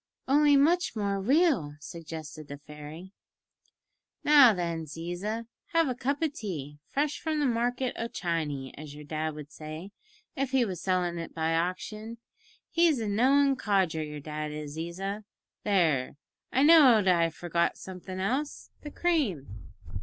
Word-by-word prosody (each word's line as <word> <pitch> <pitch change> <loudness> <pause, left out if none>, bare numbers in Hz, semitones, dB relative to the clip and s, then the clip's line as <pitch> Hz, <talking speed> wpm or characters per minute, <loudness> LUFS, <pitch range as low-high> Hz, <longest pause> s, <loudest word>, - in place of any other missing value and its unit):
"Only 290 +1 +5
much 340 +2 +3
more 200 -2 -1
real," 260 - +2
suggested 155 -1 -8
the 145 - -7
fairy. 150 +5 -11 1.1
"Now, 290 -5 +8
then, 170 -4 -2
Ziza, 175 +9 -4 0.3
have 330 -2 +4
a - - 0
cup 275 +5 -2
o' - - +4
tea, 155 - -6
fresh 295 +1 -1
from 315 -1 -1
the 295 - +2
market 245 +1 0
o' 230 - -1
Chiny, 155 - -3
as 150 -1 -9
your 150 - -10
dad 155 +1 -3
would 150 -1 -9
say, 155 +5 -8 0.4
if 270 -1 -1
he 260 -2 +3
was 185 -5 -5
sellin' 180 -2 0
it 165 - -7
by 160 0 0
auction. 210 +7 -3 0.5
He's 335 -5 +3
a 220 - -2
knowin' 270 +6 +3
codger 190 -8 +1
your 150 -1 -6
dad 150 0 -4
is, 150 -1 -6
Ziza. 190 +6 -4 0.4
There. 160 -11 +1 0.3
I 265 - +3
knowed 270 - +7
I 170 -2 +4
forgot 170 +1 -1
somethin' 185 0 -8
else 260 +10 -2
the 295 - -7
cream!" 185 - -1
185 Hz, 150 wpm, -29 LUFS, 155-260 Hz, 1.1 s, Now